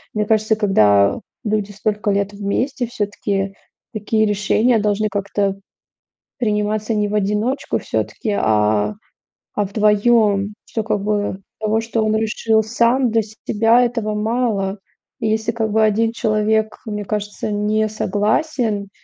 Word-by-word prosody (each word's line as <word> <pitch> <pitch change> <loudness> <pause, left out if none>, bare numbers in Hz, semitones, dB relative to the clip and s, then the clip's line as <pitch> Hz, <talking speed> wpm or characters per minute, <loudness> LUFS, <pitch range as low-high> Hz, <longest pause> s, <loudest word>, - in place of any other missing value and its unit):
Мне 210 0 +1
кажется, 220 0 +2
когда 105 - +3 0.2
люди 210 -2 -1
столько 210 +1 -2
лет 200 0 0
вместе, 240 +6 -2
все-таки 200 -3 -2 0.4
такие 215 +1 +1
решения 215 +3 +2
должны 210 +1 0
как-то 200 -1 -1 0.8
приниматься 215 0 0
не 210 -1 +1
в 205 - -4
одиночку 210 +7 0
все-таки, 215 - -3
а, 105 -1 +2 0.6
а 205 - +1
вдвоем. 210 0 +2
Что, 225 - -3
как 210 -2 -1
бы 205 -2 -1 0.2
того, 220 +1 +1
что 225 0 -1
он 215 - +1
решил 220 0 +1
сам 240 +3 +2
для 225 - +3
себя 225 +2 +2
этого 230 -3 -1
мало. 215 -3 -1 0.4
И 225 - -1
если, 220 +1 0
как 220 -2 -2
бы 220 +1 +3
1 220 +1 +2
человек, 215 -1 0
мне 210 -2 -4
кажется, 210 0 -3
не 210 +1 0
согласен 215 +1 -1
215 Hz, 130 wpm, -19 LUFS, 205-220 Hz, 0.8 s, когда